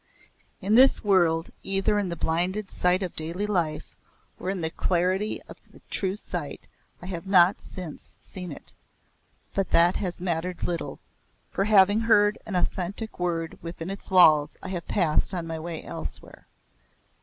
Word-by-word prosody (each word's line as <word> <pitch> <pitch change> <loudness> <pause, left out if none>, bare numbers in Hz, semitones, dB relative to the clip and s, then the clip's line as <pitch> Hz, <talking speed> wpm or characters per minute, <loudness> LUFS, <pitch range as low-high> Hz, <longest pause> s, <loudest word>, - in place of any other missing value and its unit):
In 200 +3 0
this 260 +4 +6
world, 170 -5 +2
either 195 +2 +1
in 195 -3 -1
the 170 - -3
blinded 180 +6 -1
sight 180 +2 +2
of 180 - -5
daily 170 +6 -3
life 170 -7 -2 0.4
or 185 - -3
in 190 -2 -2
the 160 0 -2
clarity 185 +5 0
of - - -13
the - - -17
true 190 -1 -1
sight 210 - -6 0.4
I - - -7
have 180 0 -6
not 185 0 +5
since 180 -5 -8
seen 180 -3 -7
it, - - -10 0.8
but 195 -2 -1
that 170 +2 +4
has 180 -3 -1
mattered 175 0 -3
little, 175 -1 -3 0.5
for 195 - 0
having 205 0 +5
heard 210 -2 +3
an 200 - -3
authentic 190 +4 -2
word 165 -2 -2
within 165 +2 -6
its 195 - -8
walls 155 -6 +5
I 190 - -5
have 175 -3 -5
passed 175 0 +2
on 170 -2 -3
my 165 -1 -5
way 165 0 -6
elsewhere. - - -5
180 Hz, 160 wpm, -26 LUFS, 170-195 Hz, 0.8 s, this